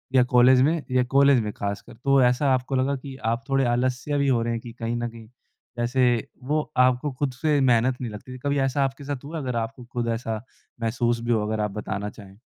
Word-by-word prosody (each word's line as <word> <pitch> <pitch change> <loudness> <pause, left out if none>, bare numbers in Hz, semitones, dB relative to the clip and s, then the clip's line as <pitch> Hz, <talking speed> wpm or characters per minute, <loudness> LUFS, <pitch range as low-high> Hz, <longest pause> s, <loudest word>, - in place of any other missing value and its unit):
या 125 - +7
कॉलेज 125 +1 +7
में 155 +2 +2
या 125 0 +3
कॉलेज 140 -2 +6
में 105 - -3
ख़ासकर। 100 0 -5
तो 135 +3 +2
ऐसा 125 +2 +3
आपको 130 +1 -1
लगा 135 +2 +1
कि, 135 0 -8
आप 115 +1 0
थोड़े 135 -1 +2
आलस्य 130 +4 -1
भी 140 -1 +1
हो 125 -3 +3
रहे 115 0 -1
हैं, 115 - -3
कि 120 - -10
कहीं 115 0 -2
ना 120 0 -2
कहीं 115 -1 -13 0.5
ऐसे 120 +1 +2 0.2
वो 150 +3 -1
आपको 130 +3 +3
खुद 140 -3 0
से 150 -2 +3
मेहनत 125 0 +2
नहीं 120 -4 -4
लगती 105 +5 -9
थी। - - -7
कभी 145 0 +1
ऐसा 135 +1 +1
आपके 135 +1 -3
साथ 140 -2 -5
हुआ, 160 +3 -5
अगर 130 -5 -3
आपको 115 +2 -4
खुद 120 -1 -2
ऐसा 110 -3 -4 0.4
महसूस 120 +1 0
भी 120 0 -1
हो, 110 -2 +2
अगर 110 0 -2
आप 105 - -2
बताना 105 0 -4
चाहें? 100 -2 -14
125 Hz, 230 wpm, -25 LUFS, 115-135 Hz, 0.5 s, या